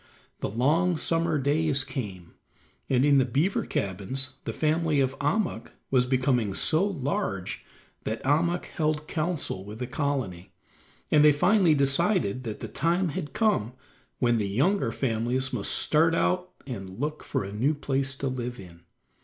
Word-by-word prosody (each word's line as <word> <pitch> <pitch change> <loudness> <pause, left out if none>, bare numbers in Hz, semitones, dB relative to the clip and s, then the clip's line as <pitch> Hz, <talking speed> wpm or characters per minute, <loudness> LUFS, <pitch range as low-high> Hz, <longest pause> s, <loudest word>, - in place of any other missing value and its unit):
The - - -2
long 155 - +2
summer 165 0 +1
days 145 0 +2
came, 105 -10 -6 0.6
and 130 +1 +3
in 140 -1 +5
the - - +4
beaver 145 +10 0
cabins 130 +8 -3
the - - -2
family 155 -1 +1
of 135 -1 +1
Ahmuk 145 - -1 0.2
was 125 -2 +3
becoming 125 -6 +1
so 160 +3 +3
large 140 - -2 0.4
that 110 +1 -3
Ahmuk 170 +6 +1
held 155 -1 -2
counsel 155 - -2
with 105 +2 -9
the 125 - -3
colony, 125 - -3 0.6
and 150 -1 +6
they 150 - +8
finally 175 +2 +4
decided 140 - +1
that 110 -2 -5
the - - -4
time 170 +4 0
had 155 -1 -5
come 205 - +1 0.4
when 120 -2 +2
the 100 -2 -1
younger 135 - +1
families 125 +2 -1
must 110 -5 -1
start 165 +2 +3
out 180 +1 +1 0.2
and 95 -6 -7
look 150 +2 -3
for - - -2
a 100 +1 -7
new 135 +9 +1
place 135 -2 -1
to 135 - -3
live 125 -1 -4
in. 85 -3 -12
135 Hz, 155 wpm, -27 LUFS, 120-160 Hz, 0.6 s, they